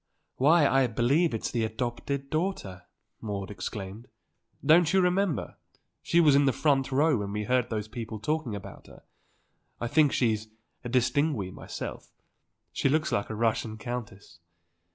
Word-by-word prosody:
"Why, 150 +4 +5
I 135 -1 +3
believe 135 +9 +2
it's 115 - -3
the 120 -2 0
adopted 120 +5 -3
daughter!" 155 - -3 0.3
Maude 100 -2 -4
exclaimed. 105 +2 -6 0.6
"Don't 160 +1 +5
you 190 - +5
remember. 180 -2 0 0.4
She 170 - +2
was 155 -4 +6
in 140 +1 +5
the 135 - +4
front 135 0 +1
row 145 -3 +3
and 100 0 -4
we 105 +1 -2
heard 125 +2 +1
those 110 -2 -3
people 110 -1 -6
talking 140 0 -2
about 100 - -10
her. - - -16 0.8
I - - -3
think 150 +2 +4
she's 110 -3 0 0.4
distinguée 125 - 0
myself. - - -7 0.7
She - - +1
looks 155 +2 +1
like 100 - -1
a 110 - -4
Russian 110 0 0
countess." 110 -7 -7
125 Hz, 150 wpm, -28 LUFS, 110-150 Hz, 0.8 s, was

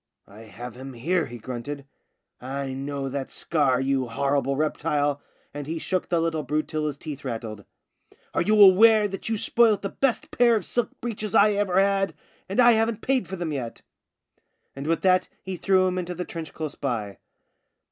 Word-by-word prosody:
" - - -52
I 110 +3 -13
have 120 +3 -9
him 130 +2 -9
here," 160 +6 0
he 120 -1 -8
grunted. 130 +5 -6 0.4
" - - -57
I 135 +1 -4
know 140 +1 -4
that 135 0 -4
scar, 140 -6 +1
you 135 -1 0
horrible 140 +3 0
reptile," 145 -1 0 0.3
and 145 -1 -6
he 165 +1 -3
shook 185 +3 -2
the 170 - +2
little 165 -1 0
brute 150 +2 -1
till 155 -1 -2
his 145 -2 -4
teeth 140 -1 -7
rattled. 110 -5 -5 0.3
" - - -31
Are - - +1
you 210 +4 +3
aware 210 +2 +7
that 195 +2 -5
you 225 - 0
spoilt 220 -1 +3
the 195 - -2
best 270 -3 -1
pair 240 -1 +4
of 205 -6 -2
silk 240 -3 -1
breeches 215 -3 -4
I 210 +1 +6
ever 200 -2 +1
had, 195 0 +2 0.3
and 195 - -2
I 240 -1 +8
haven't 225 -1 +1
paid 260 -8 +1
for 190 - -5
them 170 -4 -3
yet? 125 -5 -5 0.5
" - - -47
And 140 +2 -6
with 165 0 +1
that 185 -1 +3
he 190 0 -4
threw 185 +1 +3
him 185 0 0
into 180 0 -4
the 180 +1 -4
trench 165 -3 -7
close 155 -2 -5
by. 110 -8 -4
155 Hz, 200 wpm, -25 LUFS, 135-195 Hz, 0.5 s, I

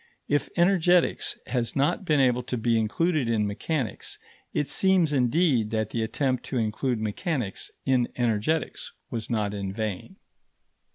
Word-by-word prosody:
If 145 0 +1
energetics 180 -1 +3
has 120 -3 -1
not 145 +8 +1
been 150 -4 +3
able 125 -2 +3
to 125 0 -4
be 115 +1 +1
included 145 +4 +1
in 110 -2 +2
mechanics, 120 +6 -3 0.3
it 145 - -1
seems 180 0 +3
indeed 130 -3 +2
that 110 -1 -1
the 115 - -1
attempt 130 +3 -1
to 130 - -3
include 115 +2 0
mechanics 110 - -2 0.2
in 130 -3 +3
energetics 120 +6 -1 0.2
was 115 -2 -4
not 105 -4 0
in 100 -2 -3
vain. 110 - -4
125 Hz, 140 wpm, -26 LUFS, 110-150 Hz, 0.3 s, energetics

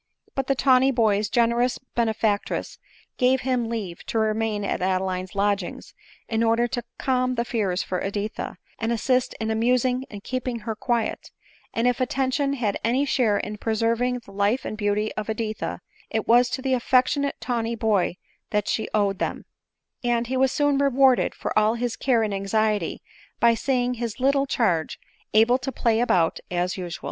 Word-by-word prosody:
But 270 -1 -2
the 275 - +2
tawny 260 0 +4
boy's 215 -5 +2
generous 240 +1 +2
benefactress 220 -4 -1 0.4
gave 255 +1 +3
him 250 -3 0
leave 200 -7 -5
to - - -2
remain 220 -1 0
at - - -2
Adeline's 185 0 -1
lodgings, 200 -2 -1 0.3
in 225 0 0
order 230 +1 +3
to 240 +1 -3
calm 255 -1 0
his 235 0 -1
fears 195 -7 0
for 180 - -3
Editha, 205 +2 -4 0.2
and 225 +1 -1
assist 250 +2 +1
in 220 0 -1
amusing 250 +3 +1
and 205 -3 -9
keeping 255 -2 -3
her 225 - -3
quiet; 235 +1 -2 0.4
and 230 +2 +1
if 250 +1 +1
attention 275 +1 0
had 225 -7 -1
any 255 +5 +2
share 240 -7 +2
in 210 0 -5
preserving 230 +3 0
the - - -13
life 205 +5 0
and - - -4
beauty 210 0 0
of 215 0 -5
Editha, 220 0 -3 0.3
it 220 -1 -2
was 245 +1 +5
to 260 +1 -4
the 265 -1 +1
affectionate 260 +3 +2
tawny 235 -2 -2
boy 210 -5 +1 0.3
that 210 -1 0
she 220 - -1
owed 200 -2 +1
them; - - -3 0.6
and 240 -1 +1
he 255 +3 -3
was 260 0 +3
soon 290 -1 +2
rewarded 270 -2 +3
for - - -4
all 215 +1 +3
his 235 -1 -2
care 240 -3 +2
and 210 -2 -1
anxiety 205 -1 0 0.4
by 235 0 +5
seeing 250 +1 0
his 235 -1 -4
little 275 +1 +2
charge 180 -12 0 0.4
able 235 +4 +5
to 265 +1 -4
play 230 -3 +1
about 180 -9 +2
as 180 +1 -1
usual. 175 -2 -5
230 Hz, 170 wpm, -24 LUFS, 210-255 Hz, 0.6 s, was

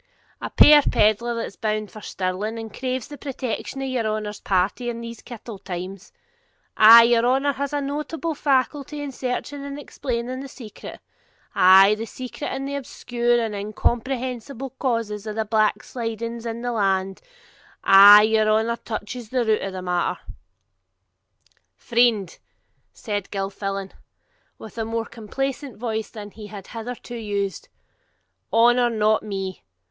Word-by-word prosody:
'A - - -4
puir 300 0 +9
pedlar, 220 -1 +2
that's 230 -3 -5
bound 215 -1 -2
for 215 - -11
Stirling, 195 +4 -3
and 225 -2 -7
craves 255 -2 -3
the 290 -2 -10
protection 270 0 -4
of - - -2
your 250 -4 -1
honour's 215 -1 -3
party 195 +6 0
in 235 -1 -5
these 230 -1 -8
kittle 230 -3 -9
times. 190 +1 -7 0.6
Ah' 230 +2 +10
your 235 0 +3
honour 270 +3 +2
has 280 +1 -3
a 290 - -1
notable 300 +4 -3
faculty 285 +1 0
in 290 -1 -5
searching 265 +2 -4
and 280 0 -6
explaining 255 -3 -4
the 275 - -7
secret, 240 -5 -11 0.5
ay, 190 +2 +7
the 220 +2 -4
secret 255 +5 -7
and 270 +1 -4
obscure 245 -3 -1
and 225 -2 -2
incomprehensible 245 +5 -3
causes 230 -6 -2
of 210 - -4
the 220 0 -1
backslidings 230 +1 -2
of 230 0 -4
the 245 - -1
land; 195 -3 0 0.6
ay, 205 +2 +9
your 215 0 +3
honour 220 +2 +1
touches 225 +1 -6
the 250 -1 0
root 220 -1 +2
o' 195 - -3
the 185 -1 -7
matter.' 180 -1 -1 1.6
'Friend,' 230 -6 +1 0.5
said 205 -4 -4
Gilfillan, 195 0 -4 0.7
with 220 +1 -10
a - - 0
more 225 +1 -2
complacent 270 +4 -5
voice 220 -2 -3
than 210 -2 -9
he 215 0 -10
had 200 -2 -9
hitherto 240 +1 -7
used, 205 -3 -3 0.8
'honour 240 +1 +4
not 215 -1 +2
me. 195 -3 -5
230 Hz, 140 wpm, -23 LUFS, 210-255 Hz, 1.6 s, Ah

